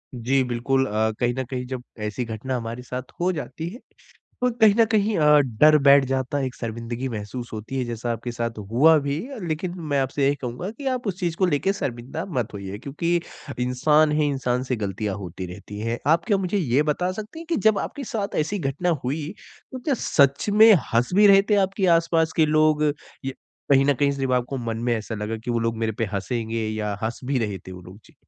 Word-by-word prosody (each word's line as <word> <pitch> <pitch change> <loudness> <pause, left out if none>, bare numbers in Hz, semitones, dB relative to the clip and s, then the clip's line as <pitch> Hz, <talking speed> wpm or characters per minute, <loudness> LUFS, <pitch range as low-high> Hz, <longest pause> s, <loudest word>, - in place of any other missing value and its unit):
जी 130 +3 +1
बिल्कुल, 125 +2 0
अ, 110 -1 0
कहीं 120 0 +1
न 130 - 0
कहीं 125 -1 -3
जब 130 -1 -5 0.2
ऐसी 105 +4 -2
घटना 115 +4 -4
हमारे 115 +1 -5
साथ 125 +1 -6
हो 180 +2 +2
जाती 160 +1 -5
है। 235 +7 -10 0.6
तो 250 0 +2
कहीं 215 -2 +7
न 230 - +7
कहीं 215 -1 +1
अ, 150 -1 +6
डर 145 +4 +5
बैठ 140 -1 +7
जाता 130 +2 -1
है 135 - 0
एक 130 - -6
शर्मिंदगी 115 +2 -4
महसूस 115 +2 -6
होती 110 +5 -6
है 125 - 0
जैसा 120 0 -4
आपके 115 +1 -5
साथ 115 -2 -3
हुआ 155 +7 +6
भी 140 +2 -1 0.3
लेकिन 175 +3 -3
मैं 140 - +3
आपसे 135 +1 0
यही 140 - +3
कहूँगा 130 - -5
की 270 +5 -9
आप 245 -3 -5
उस 190 -2 -2
चीज़ 170 -2 -1
को 185 - +2
लेके 160 +4 +1
शर्मिंदा 135 -1 -4
मत 115 -3 -2
होइए। 100 0 -6
क्योंकि 150 +7 -2 0.4
इंसान 150 +5 +3
ही 150 - +3
इंसान 130 -2 -1
से 130 -1 -2
गलतियाँ 100 -1 -3
होती 95 -1 -6
रहती 105 +3 -9
है। 115 +2 -2
आप 165 +3 +3
क्या 205 -4 +2
मुझे 190 +1 -1
ये 140 -4 +2
बता 180 +4 0
सकती 215 +9 -8
हैं 330 - -9
कि 335 - +1
जब 210 - +2
आपके 285 -2 -5
साथ 210 -3 -3
ऐसी 200 +7 -2
घटना 145 +3 -2 0.2
हुई 145 +4 -2 0.4
तो 260 - -5
क्या 275 +2 0
सच 140 +5 +2
में 220 +1 +8 0.2
हँस 120 +2 +2
भी 210 +1 +7
रहे 195 -1 +7
थे 210 - +5
आपके 195 0 -1
आसपास 165 -1 +1
के 160 -2 +4
लोग? 155 0 +3 0.4
या 135 - -2 0.4
कहीं 135 0 +6
न 145 - +3
कहीं 140 +1 +2
सिर्फ़ 135 -2 -2
आपको 125 +2 0
मन 115 -3 -3
में 120 - +3
ऐसा 110 +1 -5
लगा 105 +1 -3
कि - - -2
वो 120 - +1
लोग 115 0 -1
मेरे 110 -1 -1
पे 115 - +1
हँसेंगे 110 +3 -2
या 105 -1 -2
हँस 110 +1 -3
भी 135 0 0
रहे 105 -5 -2
थे 95 +2 -11
वो 90 - -9
लोग? 90 +4 -13
जी। - - -21
135 Hz, 225 wpm, -24 LUFS, 115-160 Hz, 0.6 s, में